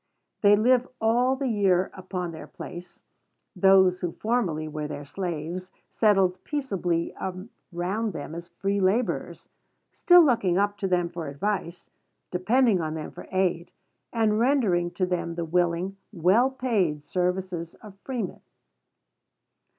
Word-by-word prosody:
They 205 0 +7
live 245 +4 +3
all 240 +4 +2
the 270 0 -2
year 195 -5 +2
upon 180 -2 -5
their 160 - -9
place; 175 0 -10 0.5
those 190 -1 +5
who 175 -2 -3
formerly 195 -10 -1
were 150 -1 -4
their 145 -1 -7
slaves 175 +2 -5 0.2
settled 195 -4 +2
peaceably 190 - -2 0.6
around 195 +6 -2
them 155 0 -6
as 170 +1 -7
free 195 +3 -2
laborers, 200 +6 0 0.4
still 355 -2 +6
looking 200 -10 +2
up 205 +1 +1
to 195 - -1
them 180 -2 +1
for 170 -2 -6
advice, 170 +3 -3 0.4
depending 210 +2 +2
on 155 -1 -3
them 155 - -6
for - - -11
aid, 180 -2 0 0.4
and 220 -2 +1
rendering 225 -10 +2
to 180 +2 -1
them 175 -2 -2
the 170 -1 -3
willing, 175 +3 0
well 200 +7 +3
paid 210 - -1
services 180 0 -2
of 210 -3 -13
freemen. 240 -8 -4
185 Hz, 135 wpm, -26 LUFS, 175-215 Hz, 0.6 s, They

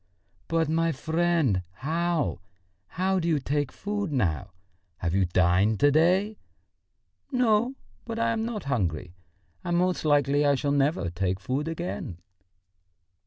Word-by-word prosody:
"But, 165 -1 +1
my 165 +1 +1
friend, 160 - +1
how... 160 - -1 0.5
how 190 +2 0
do 170 - -2
you 160 -3 +3
take 145 0 -1
food 205 -3 -3
now? 95 - 0 0.5
Have 85 -1 -2
you 95 0 +3
dined 90 +4 +2
to 145 0 +6
day?" 185 +8 +2 0.9
"No, 245 0 +2 0.3
but 230 -1 -5
I 230 0 +1
am 225 -1 -1
not 225 -3 -4
hungry, 90 - -2 0.5
and 175 0 0
most 180 +1 +1
likely 145 -1 +3
I 145 -1 +4
shall 140 +1 -1
never 140 - +1
take 95 +1 -1
food 135 +9 -2
again. 165 - -4
150 Hz, 135 wpm, -27 LUFS, 110-175 Hz, 0.9 s, to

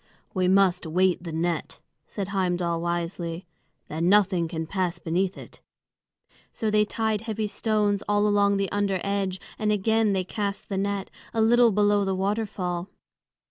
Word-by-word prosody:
"We 185 -1 +1
must 185 -2 +3
weight 180 +2 +2
the 170 -2 -6
net," 165 0 -2 0.3
said 200 -2 -5
Heimdal 175 -3 0
wisely; 170 0 -3 0.4
"then 165 +3 0
nothing 190 -4 +3
can 160 -1 -4
pass 180 0 -1
beneath 175 +3 -1
it." - - -12 0.9
So 220 -1 -2
they 210 0 +4
tied 220 -1 -1
heavy 220 -1 -3
stones 210 -1 0
all 205 0 +3
along 200 -1 +3
the 195 -1 -1
under 200 -2 0
edge, 195 -2 -1 0.2
and 215 -1 +1
again 215 +1 +2
they 190 -1 0
cast 200 +1 -4
the 195 - -2
net, 200 0 -2 0.2
a - - +1
little 235 +1 +5
below 205 0 +3
the 195 -1 0
waterfall. 190 -3 -2
195 Hz, 155 wpm, -26 LUFS, 175-205 Hz, 0.9 s, little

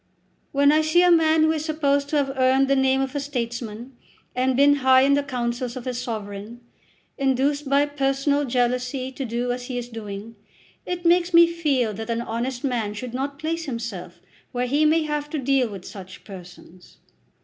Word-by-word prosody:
"When 285 +1 +4
I 310 +1 +4
see 315 +3 +3
a 360 - +5
man 320 -1 +4
who 315 - +4
is 310 -1 -2
supposed 285 -3 0
to 300 - +1
have 275 -1 0
earned 265 +1 +3
the 275 - +3
name 265 0 +2
of 270 -1 -3
a - - 0
statesman, 240 -3 -5 0.4
and 255 0 +1
been 285 +1 +5
high 260 -1 +5
in 275 +1 +4
the 285 - +3
councils 245 -2 -3
of 255 - -7
his 250 -1 -3
sovereign, 215 -1 -6 0.6
induced 275 +2 0
by 280 +1 +4
personal 285 0 0
jealousy 250 +1 -1
to 270 - -5
do 245 0 -2
as 245 0 -4
he 250 -1 -5
is 245 0 -5
doing, 220 -1 -8 0.5
it 355 -1 -4
makes 345 0 +3
me 340 0 +9
feel 295 -9 0
that 220 +3 -7
an 230 0 -1
honest 240 +2 -4
man 230 -6 -1
should 245 +2 -6
not 275 +2 -3
place 325 +2 -3
himself 230 -8 -6 0.3
where 245 -1 -1
he 285 +5 +2
may 315 +1 +3
have 295 -1 -3
to 310 - -3
deal 270 -3 +1
with 195 -3 -9
such 190 -2 -10
persons." 180 -2 -13
265 Hz, 195 wpm, -23 LUFS, 235-285 Hz, 0.6 s, me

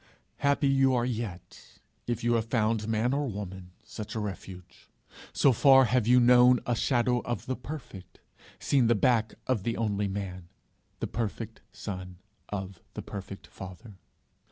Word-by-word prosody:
Happy 140 0 +2
you 135 -1 +4
are 120 -1 +1
yet, 110 -7 -6 0.3
if 120 -1 -2
you 120 0 +2
have 115 -2 +1
found 110 -2 0
man 115 +3 +1
or 145 0 0
woman 95 -3 -7
such 110 0 -8
a - - -1
refuge; 95 -3 -8 0.4
so 135 - +4
far 135 +2 +6
have 120 -1 +1
you 125 +1 +6
known 125 0 +6
a 120 - +1
shadow 125 +1 +1
of 120 0 -4
the 130 - -2
perfect, 125 - -9 0.4
seen 130 -4 +2
the 120 - +4
back 110 0 +2
of 130 -6 0
the 115 +4 -2
only 105 -2 0
man, 95 -3 -5 0.5
the - - 0
perfect 115 -3 -4
Son 90 -2 -7 0.3
of 95 -3 -5
the - - -5
perfect 100 -1 -8
Father. 95 +2 -11
115 Hz, 155 wpm, -28 LUFS, 100-125 Hz, 0.5 s, far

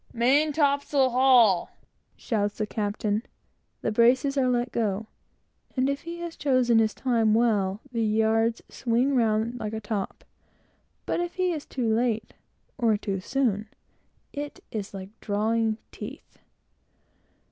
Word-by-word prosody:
"Main 275 +6 +3
topsail 280 -2 +2
haul!" 245 -7 +5 0.5
shouts 205 -3 -2
the 215 - -1
captain; 210 0 -1 0.6
the - - 0
braces 250 +5 +3
are 260 -2 +2
let 245 0 0
go; 215 -2 -1 0.7
and 255 +1 +2
if 280 - -4
he 340 0 -7
has 340 -1 -5
taken 255 -5 +3
his 220 -2 +1
time 225 -4 +2
well, 210 -4 +1
the 230 -2 -1
yards 225 +1 +1
swing 250 +3 0
round 225 0 +1
like 215 -1 -4
a 220 - -2
top; 210 -2 -4 0.8
but - - -1
if 350 0 -3
he 365 -1 +1
is 310 -4 -5
too 250 -3 -2
late, 225 -1 0 0.5
or 225 -4 +3
too 200 -2 -3
soon, 215 -2 -1 0.6
it 290 0 -6
is 210 -3 -4
like 190 0 -7
drawing 220 +1 0
teeth. - - -10
230 Hz, 135 wpm, -26 LUFS, 215-260 Hz, 0.8 s, haul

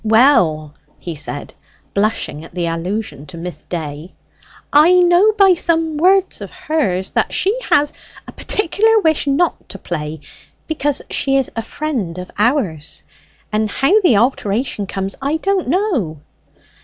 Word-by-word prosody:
"Well," 200 - +3 0.2
he 170 - -6
said, 150 -1 -4 0.4
blushing 200 -7 -1
at 165 - -14
the 175 -1 -1
allusion 170 -1 -4
to 175 - -9
Miss 175 +1 -7
Day, 155 0 -6 0.6
"I 305 +5 +6
know 360 +3 +5
by 390 -3 +5
some 325 -2 0
words 375 +4 +2
of - - -6
hers 195 - -2
that - - 0
she 395 +4 +2
has 290 0 +3 0.3
a - - -8
particular 440 +3 +1
wish 315 -3 +1
not 300 +5 0
to - - -7
play, 155 -4 -5 0.5
because 290 -3 -1
she 270 -1 +1
is 270 -2 +1
a 225 - -1
friend 225 - -4
of 180 0 -7
ours; 205 - 0 0.5
and 215 0 0
how 355 - +3
the 285 - +4
alteration 215 -2 0
comes, 195 0 -3
I 285 +4 0
don't 390 0 -1
know." 285 - 0
245 Hz, 145 wpm, -18 LUFS, -, 0.6 s, I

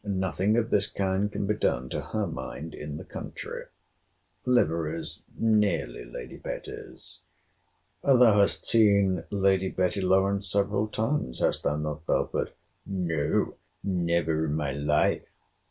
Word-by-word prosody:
Nothing 95 +1 +1
of 115 -1 0
this 105 0 +3
kind 100 +1 0
can 100 - -2
be 105 - +2
done 65 -11 0
to - - -2
her 110 -1 -2
mind 75 0 -6
in 75 0 -6
the - - -7
country. - - -7 0.8
Liveries 85 -9 +1 0.2
nearly 105 - +1
Lady - - -8
Betty's. - - -8 0.8
Thou 135 -2 +5 0.2
hast 100 - +2
seen 100 -5 +4
Lady 95 -2 +2
Betty 95 +2 0
Lawrance 95 +2 +2
several 100 +2 +1
times—hast 110 - 0
thou 75 - 0
not, 75 +1 -4
Belford? - - 0 0.3
No, 85 -6 0 0.3
never 85 -4 +1
in 75 -1 -1
my 75 -3 -1
life. 75 +2 +1
95 Hz, 125 wpm, -28 LUFS, 75-100 Hz, 0.8 s, Thou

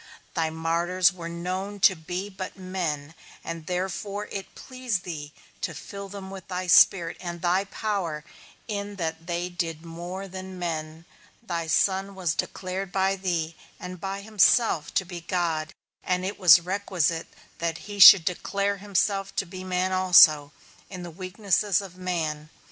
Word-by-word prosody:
Thy 160 -1 0
martyrs 170 +3 +1
were 170 -2 -7
known 185 +4 -4
to 190 - +6
be 180 +4 -5
but 190 -1 -7
men, 170 -6 -4 0.3
and 165 -1 -6
therefore 190 +3 -3
it 195 -1 -7
pleased 255 -8 -3
thee 150 -4 -6 0.3
to 170 - -3
fill 200 +5 -8
them 195 -1 -8
with 190 -2 -9
thy 185 -1 -3
Spirit 175 0 +5
and 175 -1 -5
thy 180 +3 +2
power, 195 -7 -3 0.4
in 205 -2 -4
that 165 -2 -4
they 175 0 -2
did 170 -2 -4
more 175 +4 -6
than 190 0 -8
men; 160 -2 -4 0.4
thy 170 -6 -3
Son 195 +4 +1
was 180 -4 -1
declared 185 +3 -4
by 195 0 +1
thee, 170 -4 -2 0.2
and 180 -1 -8
by 195 0 -4
himself, 210 -5 +3
to 190 - +2
be 175 -1 -7
God; 165 -3 -1 0.3
and 180 0 0
it 200 +2 -4
was 175 -3 +8
requisite 175 -3 -1 0.3
that 165 -1 -1
he 205 -1 -7
should 190 -3 +11
declare 200 +3 -1
himself 195 0 -1
to - - 0
be 185 +1 -8
man 185 0 -1
also, 175 -6 +6 0.4
in 185 -2 -7
the 175 - -7
weaknesses 190 +2 0
of 195 -3 -9
man. 160 -5 -3
180 Hz, 155 wpm, -26 LUFS, 170-195 Hz, 0.4 s, should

